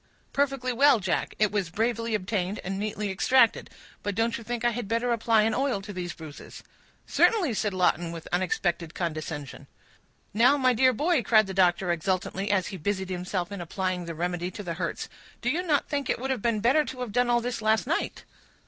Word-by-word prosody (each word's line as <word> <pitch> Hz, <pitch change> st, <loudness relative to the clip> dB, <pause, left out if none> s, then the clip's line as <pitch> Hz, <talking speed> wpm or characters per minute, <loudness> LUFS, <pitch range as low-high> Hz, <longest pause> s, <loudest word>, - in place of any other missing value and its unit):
"Perfectly 275 Hz, -3 st, 0 dB
well, 275 Hz, 0 st, +5 dB
Jack; 190 Hz, -3 st, -1 dB
it 210 Hz, -1 st, +2 dB
was 200 Hz, -4 st, -1 dB
bravely 230 Hz, +3 st, -1 dB
obtained, 195 Hz, 0 st, -2 dB
and 195 Hz, +1 st, -3 dB
neatly 210 Hz, -1 st, -2 dB
extracted; 235 Hz, +5 st, +3 dB, 0.3 s
but 205 Hz, -1 st, -3 dB
don't 230 Hz, +2 st, +1 dB
you 230 Hz, -, -6 dB
think 240 Hz, +1 st, -3 dB
I 240 Hz, -, +4 dB
had 235 Hz, -2 st, -4 dB
better 230 Hz, +3 st, 0 dB
apply 230 Hz, -1 st, +3 dB
an 220 Hz, 0 st, +1 dB
oil 260 Hz, -3 st, 0 dB
to 205 Hz, +1 st, -8 dB
these 180 Hz, -2 st, -4 dB
bruises?" 155 Hz, -2 st, -11 dB, 0.4 s
"Certainly," 360 Hz, -, +3 dB
said 210 Hz, 0 st, 0 dB
Lawton, 175 Hz, -2 st, +1 dB
with 165 Hz, -1 st, -8 dB
unexpected 175 Hz, -2 st, -1 dB
condescension. 155 Hz, -4 st, -5 dB, 0.7 s
"Now, 245 Hz, +7 st, +5 dB
my 255 Hz, -2 st, +3 dB
dear 255 Hz, +2 st, +4 dB
boy," 300 Hz, +4 st, +1 dB
cried 215 Hz, -1 st, +4 dB
the 190 Hz, -, -6 dB
doctor, 180 Hz, -1 st, +3 dB
exultantly, 185 Hz, +3 st, -1 dB
as 195 Hz, -3 st, +1 dB
he 195 Hz, -, -6 dB
busied 190 Hz, +2 st, -2 dB
himself 180 Hz, 0 st, -3 dB
in 200 Hz, -3 st, -5 dB
applying 180 Hz, +1 st, -2 dB
the 165 Hz, -1 st, -6 dB
remedy 175 Hz, +1 st, -2 dB
to 205 Hz, -, -8 dB
the 170 Hz, -3 st, -3 dB
hurts, -, -, -3 dB, 0.3 s
"do 245 Hz, -, 0 dB
you 335 Hz, +5 st, 0 dB
not 310 Hz, -6 st, +1 dB
think 280 Hz, -3 st, -2 dB
it -, -, +1 dB
would 265 Hz, +2 st, -3 dB
have 255 Hz, -5 st, -2 dB
been 230 Hz, -2 st, 0 dB
better 270 Hz, +7 st, +4 dB
to 255 Hz, -3 st, -7 dB
have 245 Hz, -4 st, -4 dB
done 245 Hz, +3 st, +2 dB
all 240 Hz, 0 st, +4 dB
this 240 Hz, -1 st, -3 dB
last 220 Hz, 0 st, +2 dB
night?" 320 Hz, +6 st, -2 dB
210 Hz, 205 wpm, -27 LUFS, 180-245 Hz, 0.7 s, well